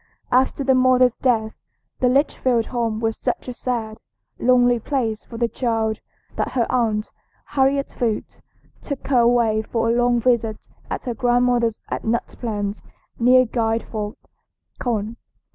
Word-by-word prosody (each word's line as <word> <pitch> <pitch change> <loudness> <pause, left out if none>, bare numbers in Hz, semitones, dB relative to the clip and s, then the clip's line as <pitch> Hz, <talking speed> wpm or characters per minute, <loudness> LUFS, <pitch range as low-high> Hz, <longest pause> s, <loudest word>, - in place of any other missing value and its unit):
After 260 +2 +2
the 265 0 +3
mother's 255 -1 +4
death 220 -4 +1 0.5
the 250 - +3
Litchfield 255 -3 +2
home 230 -3 -2
was 225 -1 0
such - - -2
a 250 - -4
sad, 230 -3 -3 0.4
lonely 245 -1 +4
place 225 -3 -2
for 230 - -9
the 235 0 +1
child 225 -3 -1 0.4
that - - -2
her 240 -3 +2
aunt, 220 -4 0 0.3
Harriet 275 0 +1
Foote, 225 -3 -2 0.4
took 280 -3 -6
her 260 -3 +4
away 235 -2 +3
for 230 +1 -1
a - - +1
long 245 0 +3
visit 230 -3 0 0.2
at - - -4
her 245 - -3
grandmother's 245 -1 +1
at - - -3
Nut 230 +1 0
Plains, 205 -3 -3 0.4
near 255 +2 +6
Guilford, 225 -2 -2 0.6
Conn. 225 -2 -2
235 Hz, 145 wpm, -22 LUFS, 225-250 Hz, 0.6 s, near